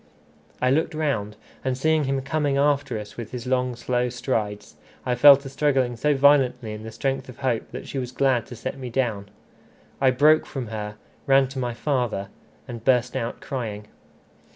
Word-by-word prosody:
I 125 - +4
looked 160 +3 +1
round, 110 -10 -1 0.3
and 130 -1 -1
seeing 155 +2 +2
him 135 0 0
coming 140 0 0
after 140 -3 +1
us 105 -1 -9
with 115 -2 -6
his 125 -1 -6
long 125 -1 0
slow 125 +1 -1
strides, 105 -5 -3 0.3
I 125 - +1
fell 140 +3 +9
to 140 0 -10
struggling 135 -2 +1
so 150 +5 +1
violently 130 -5 +3
in 105 - -7
the 110 0 -8
strength 135 +3 -2
of 125 - -10
hope 125 -4 -1
that - - -8
she 135 - -3
was 125 -1 -4
glad 130 -3 +1
to 125 - -9
set 120 - -5
me 130 -2 -5
down. 115 -5 -1 0.7
I 135 - +5
broke 150 +5 +4
from 130 -6 -5
her, 105 -1 -5 0.3
ran 135 0 +5
to 135 0 -6
my 120 -2 -2
father, 120 -8 -1 0.4
and 115 -2 -7
burst 125 -1 +2
out 115 - -3
crying. 105 -5 -5
125 Hz, 185 wpm, -24 LUFS, 115-135 Hz, 0.7 s, fell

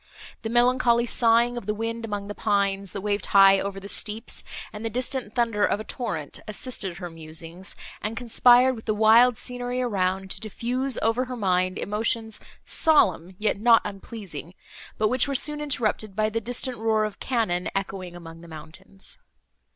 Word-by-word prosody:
The 225 - -4
melancholy 240 0 +3
sighing 235 +1 +3
of 235 - -7
the 210 - 0
wind 230 +1 -4
among 205 -2 -4
the 205 - -5
pines, 200 -2 0
that 200 - -5
waved 205 0 -1
high 195 -1 +7
over 195 0 -4
the 195 - -9
steeps, 215 +3 -2 0.3
and 210 +1 -7
the 225 - -1
distant 250 -1 -3
thunder 230 -4 +1
of 205 - +2
a - - -5
torrent 165 - -5
assisted 210 -4 -1
her 175 -2 -7
musings, 165 +3 -7 0.3
and 220 +2 -4
conspired 245 +1 +5
with 220 - -11
the 215 - 0
wild 225 +3 +6
scenery 245 0 -4
around, 190 -5 -1
to - - 0
diffuse 245 +5 -2
over 225 +3 +1
her 250 0 -6
mind 185 -3 +1
emotions 220 +1 -1 0.3
solemn, 190 - +3
yet 210 -1 0
not 230 +1 +5
unpleasing, 195 -5 -8 0.4
but 215 - +2
which 255 +4 +2
were 280 - -2
soon 295 +2 +1
interrupted 220 -8 -1
by 215 +1 +1
the 225 +1 -2
distant 245 +1 -3
roar 220 -1 +2
of 215 - -6
cannon, 220 -9 -1
echoing 190 -2 -4
among 165 -1 -11
the 170 - -13
mountains. 165 +5 -11
215 Hz, 175 wpm, -25 LUFS, 195-240 Hz, 0.4 s, high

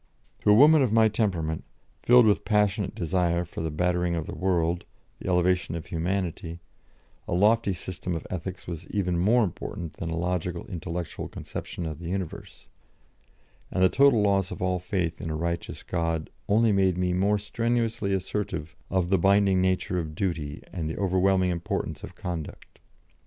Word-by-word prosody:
" - - -38
To - - +2
a 105 - +8
woman 150 +5 +7
of 125 -5 +2
my 110 0 +5
temperament, 90 -8 -1 0.4
filled 125 -1 +6
with 105 -2 +3
passionate 105 0 +1
desire 90 -2 0
for 85 - -7
the 80 - -1
bettering 90 +2 0
of 80 -2 -2
the - - -6
world, 85 -2 0 0.4
the - - -4
elevation 90 -1 +2
of 85 - -5
humanity, 85 -1 -3 0.7
a - - -1
lofty 105 +2 +3
system 90 -1 -4
of 80 - -5
ethics 90 +1 -5
was 85 -1 -6
of - - -20
even 90 -4 0
more 115 +7 +4
importance 85 -3 -5
than 85 - -3
a 80 - -2
logical, 90 0 -2
intellectual 85 -1 -5
conception 85 - -6
of 80 -1 -5
the 85 -1 -6
universe; 95 -2 -5 1.0
and 95 - +1
the 95 - +6
total 135 -4 +5
loss 100 -2 +2
of - - -7
all 90 -1 0
faith 90 -2 -2
in 80 - -4
a 80 - -2
righteous 85 +2 -3
God 85 -2 -2 0.2
only 110 +2 +4
made 95 -3 +2
me 90 0 +1
more 100 +3 +2
strenuously 115 0 -1
assertive 95 -4 -3
of 90 -2 0
the 95 -1 +3
binding 95 0 +4
nature 95 -1 +1
of 80 -2 -5
duty 80 -6 -3
and 80 -4 -3
the 80 - -4
overwhelming 95 -1 +2
importance 85 -1 -3
of - - -9
conduct. 85 -4 -7
90 Hz, 175 wpm, -27 LUFS, 85-100 Hz, 1.0 s, a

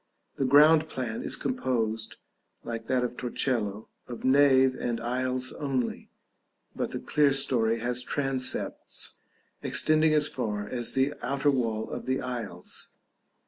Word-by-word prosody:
The 135 - 0
ground 155 +4 +6
plan 120 -4 -4
is - - 0
composed, 115 - -2 0.5
like 115 -1 -5
that 125 0 +1
of 125 0 -3
Torcello, 115 -4 -2 0.2
of 120 0 -7
nave 130 -1 +5
and 120 -2 -3
aisles 130 +1 -1
only, 135 -5 -3 0.7
but - - -2
the - - -4
clerestory 135 -6 +2
has 125 +1 0
transepts 135 -1 -1 0.4
extending 155 0 +3
as 150 0 +4
far 105 -5 -3
as 120 +2 -1
the 135 +2 +2
outer 140 +2 +1
wall 115 -5 -1
of - - -6
the 130 0 0
aisles. 115 -8 -5
130 Hz, 130 wpm, -28 LUFS, 115-135 Hz, 0.7 s, ground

